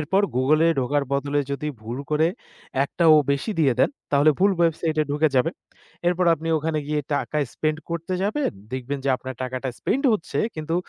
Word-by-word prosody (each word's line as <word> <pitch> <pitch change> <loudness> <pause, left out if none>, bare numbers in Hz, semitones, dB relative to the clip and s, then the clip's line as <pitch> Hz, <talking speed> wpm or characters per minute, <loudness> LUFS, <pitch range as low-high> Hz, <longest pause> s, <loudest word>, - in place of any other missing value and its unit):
এরপর 190 +7 +1
Google-এ 155 +6 +4
ঢোকার 145 +3 +1
বদলে 145 +1 +1
যদি 145 +2 -2
ভুল 115 +4 -6
করে 155 +2 +3 0.6
একটা 170 +4 -2
O - - +7 0.2
বেশি 140 +10 -2
দিয়ে 140 -4 +4
দেন, - - +4 0.2
তাহলে 145 +2 +5
ভুল 200 +2 +4
website-এ 160 -1 +1
ঢুকে 150 +2 +2
যাবেন। 160 +7 +2 0.5
এরপর 180 +1 +1
আপনি 165 +1 -6
ওখানে 155 0 -1
গিয়ে 150 0 0
টাকা 150 - -2 0.2
spend 155 0 -1
করতে 170 +2 -3
যাবেন। 215 +9 0 0.2
দেখবেন 130 +2 -3
যে - - 0
আপনার 130 0 -7
টাকাটা 130 +1 -3
spend 275 - 0
হচ্ছে 205 - -2 0.2
কিন্তু 155 +1 -3
150 Hz, 175 wpm, -24 LUFS, 140-165 Hz, 0.6 s, O